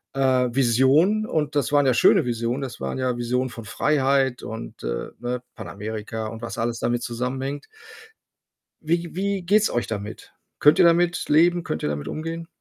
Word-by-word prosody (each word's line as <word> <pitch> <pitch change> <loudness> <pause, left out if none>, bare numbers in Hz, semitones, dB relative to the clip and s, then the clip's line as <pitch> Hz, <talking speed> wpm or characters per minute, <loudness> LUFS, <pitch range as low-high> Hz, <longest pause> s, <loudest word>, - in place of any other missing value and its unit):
äh, - - -4 0.3
Visionen 135 - +3
und 150 -2 -1
das 140 -2 0
waren 145 -1 +4
ja 130 - +4
schöne 120 - +4
Visionen. 120 +2 -2
Das 125 - -6
waren 70 - -3
ja 125 -1 0
Visionen 125 +2 -1
von 115 -1 -9
Freiheit 135 -3 +1
und, 110 +2 -8
äh, - - -3
ne, 125 0 -3
Panamerika 110 +2 -6
und 115 +1 -8
was 115 - -6
alles 115 +1 -2
damit 120 0 0
zusammenhängt. 130 +4 -4 1.2
Wie 170 +1 -1
wie 195 0 -1
geht's 210 +4 +3
euch 120 -5 -1
damit? 105 0 -7 0.2
Könnt 150 +2 +5
ihr - - +7
damit 170 +1 +3
leben? 170 +3 +4
Könnt 80 - -4
ihr - - +1
damit 75 -1 -4
umgehen? 165 +1 -5
130 Hz, 170 wpm, -23 LUFS, 115-155 Hz, 1.2 s, ihr